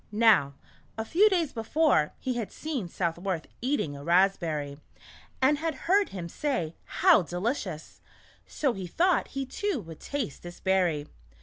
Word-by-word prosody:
Now, 210 -11 +4 0.4
a 220 - -2
few 385 - +5
days 340 -7 0
before, 225 - +2
he 255 - -2
had 235 -4 -4
seen 285 - -4
Southworth 170 0 -2 0.2
eating 250 - -1
a 140 - -9
raspberry, 165 -5 +1 0.6
and 290 +2 +4
had 320 -1 -2
heard 395 +3 +3
him 180 -3 -6
say, 170 - -2
" - - -37 0.2
How 365 - +7
delicious! 180 - -4 0.2
" - - -30
so 275 -5 0
he 190 -3 -6
thought 355 - +2
he 270 - -1
too 390 +4 -2
would 165 -3 -11
taste 275 - -4
this 175 0 -10
berry. 180 -6 +1
205 Hz, 160 wpm, -28 LUFS, -, 0.6 s, How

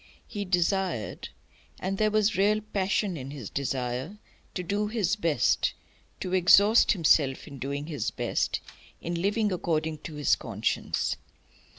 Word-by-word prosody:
He 205 -2 -4
desired 180 - -1 0.5
and 195 +1 -3
there 215 0 +3
was 215 0 +2
real 205 +3 +3
passion 200 -2 -1
in 135 -1 -7
his 140 -8 -7
desire 130 +5 -3 0.4
to 180 - -2
do 205 +4 -1
his 210 -3 0
best, 165 - +1 0.5
to 185 - -3
exhaust 200 +6 +6
himself 155 -7 +2
in 140 -3 -10
doing 140 +2 -3
his 150 -3 -2
best, - - -1 0.4
in 170 0 -3
living 210 +2 +1
according 160 -3 -1
to 155 0 -8
his 145 -1 +3
conscience. - - -2
180 Hz, 135 wpm, -28 LUFS, 150-205 Hz, 0.5 s, exhaust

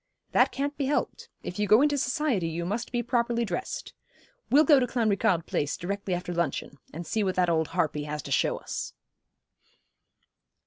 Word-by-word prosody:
'That - - +4
can't 285 +2 -2
be 280 - 0
helped. 290 - -2
If 180 - -6
you 210 - +1
go 220 +7 +6
into 295 -1 +3
society 255 - 0
you 165 +1 -3
must 215 +6 -3
be 240 -1 0
properly 235 -1 +1
dressed. 380 - -4 0.6
We'll 295 +3 +6
go 290 -2 +6
to 250 - +1
Clanricarde 205 -8 +1
Place 145 - -1
directly 195 +1 -2
after 175 0 -4
luncheon, 170 -4 -2
and 170 +3 -7
see 215 +6 0
what 185 -2 0
that 180 -2 +2
old 160 -1 +1
harpy 155 -3 -1
has 150 0 -4
to 140 - -8
show - - +2
us.' - - -5
205 Hz, 180 wpm, -27 LUFS, 170-255 Hz, 0.6 s, go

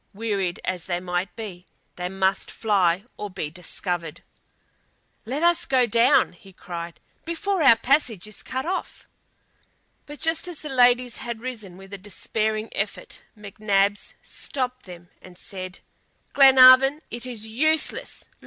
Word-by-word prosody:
Wearied 200 -5 -2
as 180 -2 -3
they 175 -2 -2
might 180 0 -3
be, 190 -6 -8 0.3
they 180 0 -4
must 190 0 0
fly 195 -3 +1
or 210 - -5
be 175 -5 -5
discovered. 175 -1 -4 1.0
"Let 270 +8 -3
us 345 0 +3
go 260 -2 +3
down!" 235 -1 +3 0.2
cried 170 -1 -7 0.2
he, - - -42
"before 355 +3 -2
our 270 -6 +8
passage 240 - +1
is 215 -1 -9
cut 260 0 -4
off." 370 +2 -4 1.0
But 295 0 -10
just 325 +2 0
as 350 -4 -7
the 305 - -7
ladies 245 -1 +3
had 235 -3 -5
risen 220 -7 -7
with 195 +1 -13
a 200 - -6
despairing 215 +3 -2
effort, - - -4 0.2
McNabbs 205 -1 0
stopped 255 -4 -4
them 175 -1 -12
and 180 -1 -14
said: 185 -1 -8 0.5
"Glenarvan, 270 +2 +7
it 240 +2 -6
is 230 -4 -4
useless. 310 +8 -1
215 Hz, 140 wpm, -24 LUFS, 185-260 Hz, 1.0 s, our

